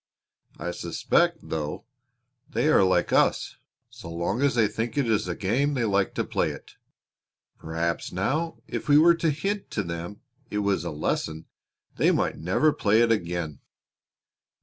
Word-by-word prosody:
I 85 +3 -4
suspect, - - +1
though, 75 -2 -4 0.6
they 155 - +1
are 155 - +5
like 95 -2 +2
us - - +2 0.3
so 85 - -10
long 85 +8 -2
as 140 -2 +2
they 110 -3 +4
think 110 +3 -4
it 140 -4 +2
is 110 -4 +1
a 90 - -2
game 130 +9 0
they 120 -3 0
like 100 -2 +1
to - - 0
play - - 0
it. - - -9 0.9
Perhaps, 85 +1 -2
now, 150 - -2
if - - -5
we 145 - +7
were 170 +3 +7
to 165 -1 0
hint 195 +8 -2
to 105 - -2
them 85 +4 -6 0.3
it 105 - -3
was 100 -5 +1
a 85 - -3
lesson 80 +1 -2 0.5
they - - +4
might - - 0
never 100 - +2
play 110 +2 +3
it 120 -1 +3
again." 85 -7 -2
100 Hz, 165 wpm, -26 LUFS, 85-140 Hz, 0.9 s, we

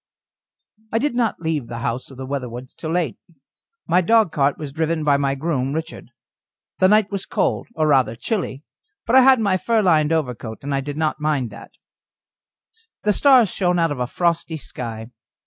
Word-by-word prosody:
I 225 - +1
did 285 +4 0
not 235 -7 -1
leave 160 -6 -2
the 120 - -6
house 120 +3 -3
of 135 - -13
the 130 - -6
Weatherwoods 130 -2 -5
till 160 - -6
late. 165 -6 -1 0.7
My 180 - +3
dogcart 170 -9 +2
was 145 -3 -7
driven 160 0 -1
by 145 -1 +3
my 140 -1 0
groom, 135 -3 -2
Richard. 160 +1 -6 0.7
The 185 - +5
night 210 0 +3
was 195 -2 -4
cold, - - -1
or 155 - +1
rather 130 -6 +3
chilly, 155 - -3 0.4
but 235 - +2
I 265 - +9
had 260 -1 +6
my 200 -4 +2
fur 225 +2 +1
lined 155 -4 +3
overcoat, 125 -8 -3
and 140 -1 -2
did 145 +1 -6
not 155 -1 -1
mind 145 -7 0
that. 105 - -12 1.3
The 210 - +3
stars 255 -3 +5
shone 180 -2 +1
out 165 -2 +2
of 145 - -4
a 125 - -1
frosty 170 +1 -1
sky. 115 -4 -7
155 Hz, 180 wpm, -21 LUFS, 135-185 Hz, 1.3 s, I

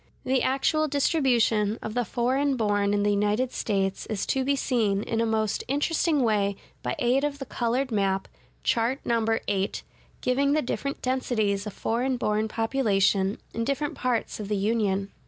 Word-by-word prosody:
(144) 260 - -1
The 260 - +3
actual 310 +3 +1
distribution 245 -7 +2
of 220 - -5
the 245 +1 +1
foreign 260 +5 0
born 205 -2 +1
in 205 0 +1
the 205 - +3
United 210 +5 +1
States 195 -2 -1
is 210 -3 -2
to 265 - 0
be 280 +2 +2
seen 220 -7 +1
in 225 0 -1
a 230 - +1
most 220 -2 0
interesting 295 +1 +1
way 205 -3 +1 0.3
by 125 - -2
aid 255 +3 +2
of 295 -1 -1
the 270 - -6
colored 250 +2 -1
map, 195 -2 0 0.4
Chart 240 +3 +1
No. 230 -1 +1
VIII, 205 -3 0 0.5
giving 280 +3 +2
the 310 - +2
different 275 +2 -3
densities 220 -6 0
of 210 - -6
foreign 250 +3 -1
born 215 -2 0
population 210 -4 +1 0.2
in 230 - -1
different 280 +4 -1
parts 245 -4 -2
of 210 - -5
the 210 0 0
Union. 200 -2 0
230 Hz, 175 wpm, -26 LUFS, 205-265 Hz, 0.5 s, The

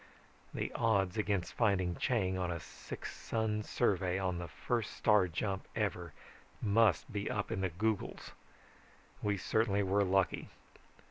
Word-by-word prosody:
The - - -3
odds 100 -4 +2
against 100 -4 0
finding 95 -6 +2
Chang 95 -5 +1
on 90 -1 -1
a 85 -1 -2
six - - -8
sun 110 -2 -1
survey 95 -5 +1
on 90 -2 -1
the 85 - -5
first 115 - -2
star 105 -4 +4
jump 95 +3 -3
ever - - -1 0.5
must 105 -3 +3
be 100 -1 -2
up 105 -2 -2
in 95 - -1
the 95 - +1
googols. 105 +5 -2 0.9
We 105 -1 +1
certainly 100 +1 +1
were 100 +2 +3
lucky. 95 0 +1
100 Hz, 140 wpm, -34 LUFS, 95-105 Hz, 0.9 s, star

